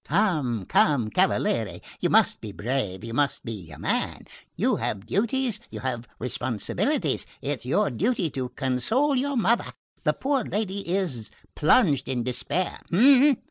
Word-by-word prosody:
"Come, 150 - +1
come, 120 -3 +2
cavaliere, - - +1 0.2
you - - +1
must - - +4
be 105 - -6
brave 105 -3 -3
you 115 0 -6
must 145 +3 0
be 105 -8 -6
a 75 - -10
man; - - -2 0.3
you - - +1
have 100 0 -3
duties, 230 - 0
you - - -7
have 120 -3 -3
responsibilities. 120 -3 -1
It's 140 -3 -3
your 180 +5 +2
duty 185 - 0
to 130 -2 -3
console 220 - +1
your 275 +1 0
mother 230 +2 +1 0.3
the - - +2
poor 270 -2 0
lady 200 -2 -2
is 170 - -1 0.2
plunged 150 - +3
in 125 -2 -1
despair. 130 +9 -1
140 Hz, 140 wpm, -26 LUFS, -, 0.3 s, must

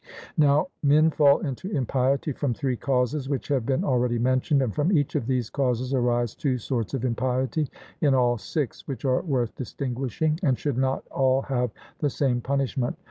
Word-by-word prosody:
Now, 150 +4 +3
men 155 +2 +4
fall 145 -2 +4
into 140 +7 -4
impiety 135 - 0
from 135 -2 -2
three 130 -1 -1
causes, 130 +2 0
which 140 0 -3
have 130 -5 0
been 135 -1 +1
already 125 -2 +1
mentioned, 130 +3 +2
and 115 -5 -2
from 150 +5 +1
each 145 -7 +2
of 135 -7 -1
these 125 -4 -1
causes 130 -1 0
arise 120 -2 +1
two 135 -5 -1
sorts 120 0 -2
of 130 -1 -2
impiety, 130 +5 0 0.3
in 140 -3 +4
all 120 -2 +2
six, 135 - -4
which 135 -2 -5
are 130 -1 +2
worth 130 -8 -1
distinguishing, 135 +4 -2
and 135 -8 +2
should 140 -4 -2
not 130 0 0
all 135 0 +2
have 125 -2 -1 0.3
the 145 - +1
same 125 -2 0
punishment. 135 -1 -1
130 Hz, 180 wpm, -25 LUFS, 125-140 Hz, 0.3 s, men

